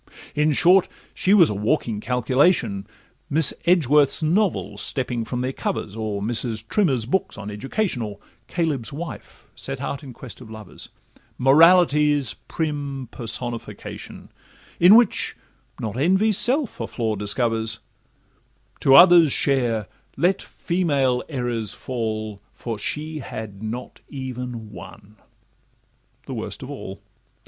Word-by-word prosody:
In 150 +1 +2
short, 180 +6 +5 0.3
she 190 - 0
was 185 - +6
a - - -1
walking 105 +1 -1
calculation, 125 - +1 0.4
Miss 155 +1 +3
Edgeworth's 150 -3 +3
novels 185 +5 0
stepping 125 -3 -2
from 125 +1 -3
their 130 +1 -2
covers, 110 -5 -4
Or 105 -3 -3
Mrs. 115 -1 -1
Trimmer's 135 - +1
books 180 +10 -1
on 105 -1 -6
education, 135 - -2
Or 105 -2 -5 0.3
'Coelebs' 150 -8 -1
Wife' 145 -7 -8
set - - -6
out 140 - -4
in 135 - -9
quest 125 0 -10
of 115 - -11
lovers, 110 -4 -10 0.5
Morality's 150 0 +5
prim 145 -5 -4
personification, 120 0 -6 0.5
In 180 +5 +8
which 235 -2 +3 0.4
not 110 -1 -4
Envy's 190 +8 +2
self 255 +4 +1
a - - -3
flaw 110 -3 -2
discovers; 110 +2 -1 1.0
To 135 - +5
others' 175 -2 +8
share 120 -8 +1 0.3
let 185 +3 +2
'female 140 -8 0
errors 120 -6 -2
fall,' 110 -4 -4
For 115 -3 -5
she 155 +7 -3
had 110 -6 -7
not 115 +3 -6
even 125 -5 -6
one—the 105 -1 -15
worst - - -5
of - - -7
all. - - -8
130 Hz, 120 wpm, -23 LUFS, 110-160 Hz, 1.0 s, In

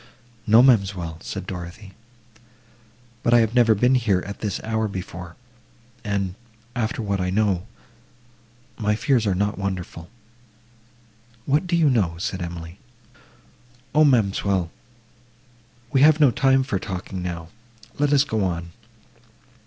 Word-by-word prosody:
—"No, 110 +3 +7
ma'amselle," 95 -10 +2
said - - -6
Dorothée, 90 +2 -8 1.3
"but 120 - +3
I - - +7
have 110 0 0
never 120 -3 +5
been 125 +5 +3
here 110 -8 +2
at 100 +1 -7
this 105 -3 -3
hour 110 0 -1
before, 90 -3 -7 0.7
and, 100 -3 -2 0.4
after 115 0 -2
what 100 -2 -1
I 90 - -1
know, 100 -1 0 1.1
my 105 -1 +1
fears 125 -3 +1
are 95 - +1
not 100 +2 -1
wonderful."—"What 115 - -7
do 175 - +1
you 165 -2 +4
know?" 105 -11 +1
said 95 +1 -4
Emily.—"O, 120 - -6
ma'amselle, 100 - +2 1.2
we 135 -2 +3
have 155 +1 +6
no 145 -5 +6
time 135 -1 +3
for 110 -8 -2
talking 95 -1 -6
now; 85 -2 -5 0.5
let 145 0 +2
us 145 -1 +5
go 110 -7 -1
on. 85 -2 -3
110 Hz, 125 wpm, -23 LUFS, 95-120 Hz, 1.3 s, No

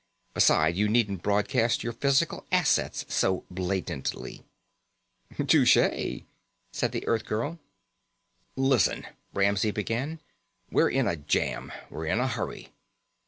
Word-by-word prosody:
Besides, 80 +2 +4
you 105 - +3
needn't 105 -5 +1
broadcast 115 +4 +1
your 120 - -3
physical 135 +3 +1
assets - - +1
so 95 -1 +1
blatantly." 90 -6 -4 0.9
"Touché," - - +3 0.5
said - - -1
the - - -4
Earthgirl. 115 +8 -1 1.0
"Listen," 130 - +2 0.3
Ramsey 100 +2 +2
began. 115 +10 -3 0.5
"We're - - +4
in 135 -1 +1
a 85 -4 0
jam. 70 - -1 0.2
We're 80 +1 -5
in 110 - +1
a 125 - +1
hurry." 115 -3 -5
105 Hz, 110 wpm, -27 LUFS, 95-125 Hz, 1.0 s, Besides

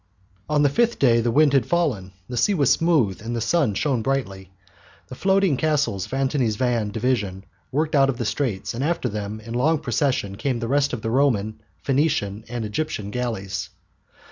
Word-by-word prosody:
On 150 -1 +3
the 145 - +4
fifth 235 - +1
day 115 -4 +4
the 120 - 0
wind 145 +4 +4
had 135 - +3
fallen, 125 - 0
the 125 - -6
sea 195 - +2
was 140 -7 +3
smooth 150 - +2
and 115 +2 -4
the - - -1
sun 115 - +1
shone 130 0 0
brightly. 100 -8 -2 0.6
The - - -8
floating 190 0 +2
castles 150 - 0
of - - -11
Antony's 135 -4 0
van 120 -3 0
division 105 -4 -2 0.3
worked 155 +3 0
out 135 -2 +4
of 130 - -2
the 120 - -3
straits, 105 -2 -2
and 120 +3 -3
after 160 -4 0
them 105 0 -5
in 115 +1 -8
long 150 +7 +2
procession 120 -6 -1
came 135 -1 -1
the 115 0 -3
rest 140 +2 +2
of 115 - -4
the 110 - -1
Roman, 110 -5 +1 0.2
Phoenician, 130 -7 0
and 120 -2 -3
Egyptian 105 -3 -3
galleys. 100 -7 -3
125 Hz, 190 wpm, -23 LUFS, 105-145 Hz, 0.6 s, the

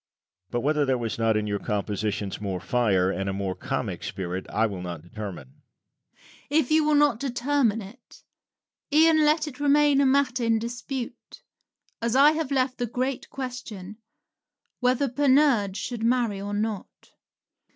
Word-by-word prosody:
But 120 - -2
whether 150 +2 +1
there 135 -2 +1
was 115 -1 -4
not 115 -1 +2
in 105 - -1
your 100 -1 -2
compositions 105 -1 -3
more 95 -3 -3
fire, 95 -4 +1
and 95 0 -2
a - - -2
more 95 -1 -2
comic - - -4
spirit, 90 0 -5
I 110 - +1
will 100 -5 -4
not 85 -3 -6
determine. 90 -8 -9 0.9
Rabelais. 300 +3 +3
If 310 -2 -1
you 310 0 +4
will 300 0 +3
not 290 -6 +3
determine 250 -3 0
it, 230 +6 -15 0.7
e'en 315 +1 +5
let 305 +1 +2
it 275 -3 -9
remain 290 -1 +4
a 275 - +4
matter 265 -2 +2
in 230 -1 +3
dispute, 240 +2 -6 0.6
as 235 +1 0
I 285 +3 +7
have 315 -3 -2
left 260 -2 0
the 245 - -1
great 255 +3 -3
question, 220 -7 -7 0.8
Whether 255 +2 +2
Panurge 260 -6 +3
should 240 -3 -4
marry 230 -4 +1
or 205 +1 -4
not? 210 -1 -4
230 Hz, 160 wpm, -26 LUFS, -, 0.9 s, I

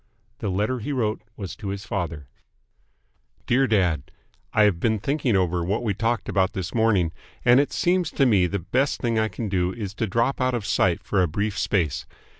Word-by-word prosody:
The 105 - -2
letter 105 +7 0
he 120 +7 -4
wrote 110 -6 -1 0.2
was 95 -4 -6
to 105 - -7
his 100 +1 -4
father: 85 -7 -4 1.2
Dear 130 +2 +3
Dad: 90 - +1 0.4
I 110 - +4
have 100 -5 +3
been 110 +4 +1
thinking 135 +1 0
over 90 -2 +1
what 100 +7 -1
we 110 -4 0
talked 115 +2 -1
about 95 -1 +1
this 95 -2 -4
morning, 105 -8 +2 0.3
and 125 +1 +7
it 145 - +1
seems 175 -1 +1
to 140 - +3
me 100 -7 +4
the 100 - -2
best 130 - 0
thing 115 -3 0
I 110 - +2
can 110 0 -5
do 90 -2 0
is 100 -2 -5
to 110 - -2
drop 115 +7 0
out 130 -1 +2
of 115 -4 -3
sight 95 -1 +1
for 95 0 +1
a 90 - +3
brief 100 +6 -2
space. 85 -10 0
105 Hz, 205 wpm, -24 LUFS, 95-120 Hz, 1.2 s, and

